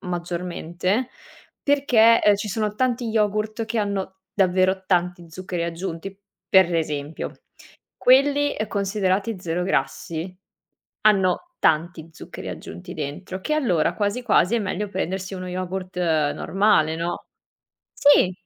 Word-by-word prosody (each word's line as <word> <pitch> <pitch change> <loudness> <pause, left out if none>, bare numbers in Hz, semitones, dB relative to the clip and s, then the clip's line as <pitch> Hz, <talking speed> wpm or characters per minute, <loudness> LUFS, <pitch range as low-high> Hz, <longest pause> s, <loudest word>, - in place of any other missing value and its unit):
maggiormente 175 +4 -2 0.5
perché, 250 -6 +5
ehm, 210 -1 +5
ci 205 +1 -4
sono 210 +1 -1
tanti 245 0 0
yogurt 215 +1 0
che 225 0 -2
hanno 195 -2 -2 0.2
davvero 190 0 +2
tanti 180 -1 0
zuccheri 180 0 -4
aggiunti. 170 +2 -5 0.3
Per 185 -3 +5
esempio, 150 -1 -3 0.6
quelli 285 +3 +4
considerati 200 +1 0
zero 175 0 -2
grassi, 170 +2 -2 0.7
hanno 195 - +3
tanti 160 +1 +1
zuccheri - - -9
aggiunti 85 +2 -8
dentro, 155 +6 -5
che 305 - -1
allora 185 - +1
quasi, 205 +4 -1
quasi 225 -3 +3
è - - +2
meglio 205 +1 -3
prendersi 190 0 -3
uno 185 0 -6
yogurt 185 0 -5 0.4
normale, 195 -6 +2
no. 170 +1 -4 0.7
Sì, 280 -10 +5
190 Hz, 115 wpm, -23 LUFS, 175-215 Hz, 0.7 s, perché